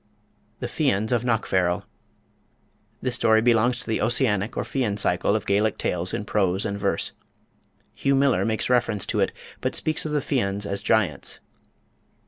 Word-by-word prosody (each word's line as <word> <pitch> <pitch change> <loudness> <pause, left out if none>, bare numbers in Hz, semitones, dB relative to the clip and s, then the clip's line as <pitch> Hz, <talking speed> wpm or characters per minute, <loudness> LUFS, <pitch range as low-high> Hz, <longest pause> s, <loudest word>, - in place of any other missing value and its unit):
The - - -2
Fians 115 -6 0
of 120 -1 +1
Knockfarrel. 95 -7 +1 1.2
This 125 - 0
story 110 -2 +4
belongs 120 +1 +2
to - - -5
the 110 - 0
Ossianic 110 -3 +1
or - - 0
Fian 120 -7 -1
cycle 95 +1 +1
of 110 - -2
Gaelic 105 +2 +1
tales 90 +1 -1
in 100 - -3
prose 95 -2 +1
and 100 -1 -3
verse. 100 -4 0 0.8
Hugh 140 0 +1
Miller 140 0 +3
makes 110 -1 -1
reference 115 -5 +1
to - - -1
it, - - +2 0.3
but - - -2
speaks 155 -1 0
of 155 - -4
the 150 - +1
Fians 105 -8 -1
as 100 -1 -2
giants. 100 -9 0
110 Hz, 160 wpm, -24 LUFS, 100-125 Hz, 1.2 s, story